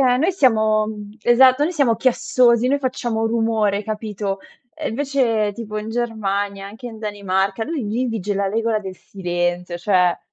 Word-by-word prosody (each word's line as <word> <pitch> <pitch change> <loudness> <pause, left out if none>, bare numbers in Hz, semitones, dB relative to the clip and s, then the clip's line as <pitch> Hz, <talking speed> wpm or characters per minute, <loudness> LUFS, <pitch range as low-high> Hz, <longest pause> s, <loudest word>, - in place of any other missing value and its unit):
noi 265 +8 +3
siamo, 220 - +3
mhmm 210 -1 -7
esatto, 255 +4 +5
noi 345 - -1
siamo 265 -7 +2
chiassosi, 245 -2 +3
noi 280 +2 +2
facciamo 240 -4 -1
rumore, 225 -3 +1
capito. 210 -2 -3 0.3
Ehm, 315 -1 -4
invece 235 -5 0
tipo 215 0 -7
in 215 +1 -4
Germania, 205 -4 -2
anche 220 +5 -10
in 225 -2 -8
Danimarca, 200 -1 -1
lui 310 +1 -3
li 235 +5 -1
vige 215 -4 -2
la 200 0 0
regola 225 +1 0
del 190 -2 -8
silenzio, 175 -2 -3
cioè 180 -1 +2
220 Hz, 155 wpm, -21 LUFS, 200-245 Hz, 0.3 s, esatto